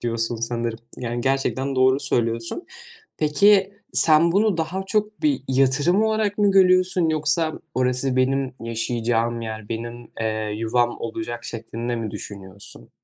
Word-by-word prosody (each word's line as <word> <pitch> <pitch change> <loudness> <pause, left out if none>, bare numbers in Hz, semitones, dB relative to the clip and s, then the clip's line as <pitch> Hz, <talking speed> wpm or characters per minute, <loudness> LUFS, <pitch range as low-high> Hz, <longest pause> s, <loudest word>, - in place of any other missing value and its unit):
Diyorsun 115 0 -1
sanırım 115 0 -3 0.2
yani 120 -1 -3
gerçekten 135 +1 0
doğru 130 +1 +4
söylüyorsun. 115 - 0 0.5
Peki, 195 +6 +4 0.2
sen 165 +1 +5
bunu 205 0 +2
daha 165 +4 -2
çok 215 +3 -1
bir 295 -2 +1
yatırım 135 +9 +3
olarak 215 -2 0
mı 205 -1 +4
görüyorsun 185 -2 +4
yoksa 155 +1 +1 0.2
orası 125 +1 0
benim 130 0 +1
yaşayacağım 115 0 -1
yer, 110 -2 -6
benim, 120 +1 -6
eee, 110 -1 -2
yuvam 120 +2 0
olacak 120 +1 -5
şeklinde 115 +1 -4
mi 115 -2 -4
düşünüyorsun? 95 -10 -8
130 Hz, 130 wpm, -23 LUFS, 115-170 Hz, 0.5 s, sen